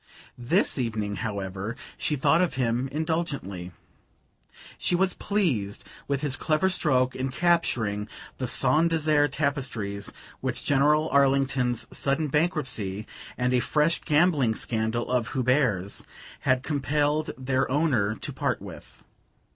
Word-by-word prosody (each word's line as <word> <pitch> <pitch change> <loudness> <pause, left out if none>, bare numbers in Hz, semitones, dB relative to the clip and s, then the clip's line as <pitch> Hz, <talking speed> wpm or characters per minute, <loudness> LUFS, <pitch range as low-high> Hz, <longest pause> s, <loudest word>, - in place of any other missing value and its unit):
This 140 - +1
evening, 110 -4 -2
however, 100 +1 -4 0.2
she 150 - -1
thought 155 +5 +3
of 180 - 0
him 125 0 0
indulgently. 145 - -3 1.1
She 180 - +1
was 185 +1 +2
pleased 140 - -1 0.2
with 140 -1 -1
his 145 -3 +2
clever 155 +6 +1
stroke 130 -7 +2
in 130 +1 -2
capturing 125 -10 +1 0.3
the 130 - -2
Saint 150 +8 +3
Desert 155 -3 +2
tapestries, 125 -9 -2 0.3
which - - -3
General 150 +2 +3
Arlington's 135 -3 +2
sudden 145 +2 0
bankruptcy, 130 - -1 0.3
and 125 0 +1
a 125 - +4
fresh 150 +6 +1
gambling 150 -7 +3
scandal 110 +1 -1
of 125 -1 0
Hubert's, 125 -7 +1 0.4
had 130 0 +1
compelled 150 +1 0
their 130 0 0
owner 130 -8 +1
to - - -6
part - - -1
with. - - -12
135 Hz, 125 wpm, -26 LUFS, 115-150 Hz, 1.1 s, a